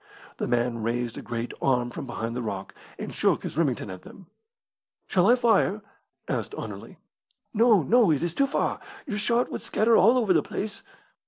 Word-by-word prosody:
The - - -2
man 120 -1 0
raised 115 +1 -2
a - - -7
great 120 0 -4
arm 125 -2 +1
from 135 - -7
behind 115 -1 -4
the 125 - -2
rock, 100 -4 -5 0.2
and - - -6
shook - - +1
his - - -5
Remington 135 - 0
at 95 - -9
them. 190 - -14 0.8
"Shall 185 -2 +2
I 245 - +7
fire?" 225 -4 +2 0.4
asked - - -3
Anerley. - - -8 0.6
"No, 220 -5 +5
no; 235 - +4
it 155 0 +2
is 170 -1 -1
too 275 +6 +2
far. 275 - -1 0.3
Your 210 - -3
shot 235 +3 +1
would - - -4
scatter 225 +1 +2
all 230 +6 +6
over 220 -7 +3
the 160 - +4
place." 205 +7 -5
165 Hz, 185 wpm, -26 LUFS, -, 0.8 s, I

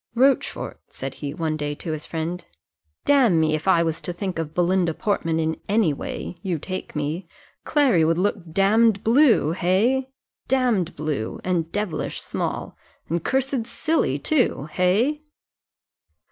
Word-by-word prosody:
"Rochfort," 265 +3 +1
said - - -6
he, 145 -2 -5
one 160 0 -2
day, 145 -1 -3
to 160 - -5
his 155 -1 -5
friend, 165 +2 -3 0.6
"damme, 240 - +4
if 155 +2 0
I 170 -3 +5
was 165 -1 -2
to - - -3
think 175 0 -4
of 160 -1 -4
Belinda 175 -2 +2
Portman 165 -6 0
in 160 0 -1
any 205 -7 +3
way 170 - -6
you 185 -4 -1
take 185 +4 -6
me 155 +5 -3 0.4
Clary 265 - +3
would 165 +1 +2
look 185 -3 -1
damned 205 +3 +3
blue 230 - +4
hey? 210 +10 +1 0.4
damned 240 -10 +1
blue, 145 -7 -3
and 170 -3 -1
devilish 205 -7 -2
small, - - -4 0.3
and 170 0 -1
cursed 265 -3 0
silly 320 +1 0
too 260 - +1
hey?" 215 - +2
180 Hz, 145 wpm, -23 LUFS, 160-225 Hz, 0.6 s, I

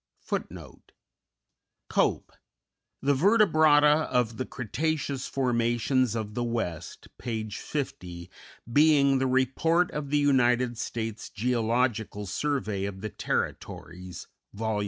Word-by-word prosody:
_Cope: - - +1 0.7
"The 140 +1 +3
Vertebrata 155 -4 +4
of 120 -2 0
the 130 - -3
Cretaceous 140 +2 -2
Formations 120 -1 +1
of 105 -2 -4
the 120 - -2
West," 115 -9 -4
p. 110 -3 -3
50, 90 - -5 0.4
being 145 -2 +5
the 135 - +1
"Report 135 +7 +2
of 150 -2 -4
the 150 - +2
United 125 -4 +2
States 115 -2 -4
Geological 115 -2 0
Survey 105 -3 -2
of 95 -1 -6
the 110 - -4
Territories," 90 0 -4 0.3
Vol. 110 0 -1
125 Hz, 100 wpm, -27 LUFS, 110-145 Hz, 0.7 s, being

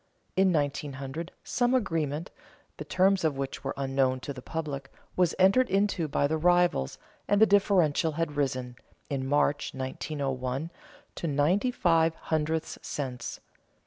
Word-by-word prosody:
In 190 0 +4
1900, 145 +1 -2
some 245 +1 +1
agreement, 165 - -1 0.5
the - - -5
terms 190 0 +2
of 155 -4 +1
which 135 -1 -4
were - - -3
unknown 135 -1 +1
to 140 - -5
the 130 - -9
public, 140 -3 -5 0.2
was 180 -2 +2
entered 195 +8 +4
into 195 -4 +1
by 145 - +1
the 155 +2 0
rivals 175 - +2 0.3
and 205 0 +3
the 220 - +8
differential 185 -7 +3
had 165 -1 -2
risen, 130 -3 -2 0.3
in 135 -1 -2
March, 145 0 +1
1901, 135 +1 -3 0.4
to 170 - -4
ninety 160 - +2
five 165 -8 +2
hundredths 160 0 -2
cents. 125 -4 -5
155 Hz, 140 wpm, -28 LUFS, 135-180 Hz, 0.5 s, the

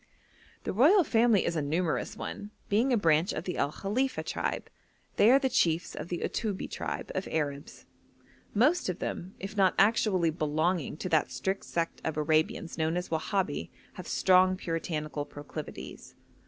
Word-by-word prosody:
The - - -3
royal 320 - +6
family 230 - +3
is 170 - -1
a 155 - 0
numerous 160 +4 -1
one, 205 - -6 0.2
being 230 +6 +2
a 245 - +4
branch 165 -1 +3
of 155 - -4
the 180 - -4
El 140 - +1
Khalifa 250 +10 -1
tribe. - - -3 0.5
They 215 - +6
are 260 - +7
the 275 -1 +1
chiefs 170 -8 +1
of 150 - -6
the 175 -1 -3
Uttubbi 210 -4 -2
tribe - - -4
of 190 - -3
Arabs. 145 -2 -3 0.7
Most 260 - +2
of 180 - -2
them, 185 +3 -5
if 195 +2 -7
not 195 -2 +3
actually 195 -5 +3
belonging 155 0 -1
to 185 - -4
that 160 -6 +2
strict 165 +10 -2
sect 165 -1 -2
of 160 -1 -2
Arabians 155 +2 0
known 160 +2 +1
as 180 - -3
Wahabi, 190 +4 -1 0.2
have - - -9
strong 185 0 +4
puritanical 155 -3 -3
proclivities. 145 +1 -9
180 Hz, 165 wpm, -29 LUFS, 155-205 Hz, 0.7 s, are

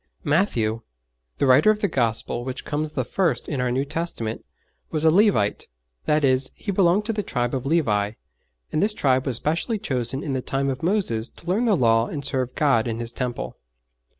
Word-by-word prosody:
Matthew, 120 - +1 0.6
the - - +1
writer 130 +11 +6
of 215 - +4
the 205 - +2
Gospel 120 - -1
which 130 0 -6
comes 150 +1 -2
the 130 - -1
first 160 -3 0
in 140 -4 -2
our 125 - 0
New 130 +3 0
Testament, 140 -8 -3 0.5
was 155 -1 -2
a 160 - +6
Levite; 185 - +2 0.4
that 150 0 +2
is, 130 -1 +2
he 205 - -4
belonged 195 +1 +3
to 225 - -1
the 210 - -1
tribe 120 -9 -2
of 135 0 -2
Levi, 105 -10 +1 0.6
and 155 - 0
this 210 +1 +2
tribe 130 -1 +2
was 125 -4 0
specially 165 - -1
chosen 130 - -2
in 140 - -3
the 130 - -1
time 135 +2 -1
of 130 - -6
Moses 165 - 0
to - - -18
learn 195 +7 +1
the 210 -5 +3
Law 115 -2 +3
and 145 -3 -5
serve 130 -3 -1
God 135 -7 +2
in 115 0 -3
His 115 0 -4
Temple. 125 -1 -4
135 Hz, 200 wpm, -23 LUFS, 120-170 Hz, 0.6 s, writer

